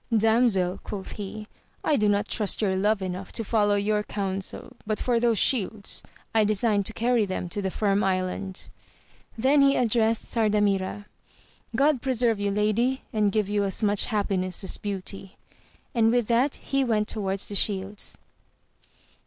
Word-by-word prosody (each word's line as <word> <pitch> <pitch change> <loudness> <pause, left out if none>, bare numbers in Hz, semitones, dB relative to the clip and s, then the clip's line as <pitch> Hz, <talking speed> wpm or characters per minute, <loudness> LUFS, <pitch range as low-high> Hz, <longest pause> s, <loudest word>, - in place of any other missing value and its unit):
Damsel, 220 -5 +2
quoth 195 -2 -6
he, 210 +1 -6 0.4
I 305 - +2
do 210 -5 +2
not 205 +1 +1
trust 210 -4 -1
your 195 -3 +1
love 200 +1 +1
enough 185 +1 -5
to 225 - -2
follow 205 -1 +2
your 210 +1 +1
counsel; 195 +4 -4
but 215 -1 0
for 240 -2 +1
those 230 -2 +2
shields, 210 -3 0 0.3
I 220 -1 +4
design 210 0 +2
to 225 - -3
carry 235 0 +2
them 185 -1 -3
to 205 - -4
the 190 - -1
Firm 200 +1 +1
Island. 190 0 -2 0.7
Then 270 +5 +4
he 275 0 +5
addressed 225 -2 +2
Sardamira 205 -3 0 0.4
— - - -28 0.3
God 280 0 +3
preserve 240 -5 +1
you 205 0 0
lady, 215 +6 +1
and 210 -2 +2
give 210 -1 +1
you 205 0 0
as 195 +2 -2
much 205 -1 +2
happiness 195 -4 -1
as 190 - 0
beauty! 195 -1 -5 0.6
and 225 -2 +4
with 240 -1 +2
that 250 +4 +2
he 275 0 -1
went 215 -4 +1
toward 195 -4 -2
the 200 - -2
shields. 200 0 -2
210 Hz, 160 wpm, -26 LUFS, 195-230 Hz, 0.7 s, he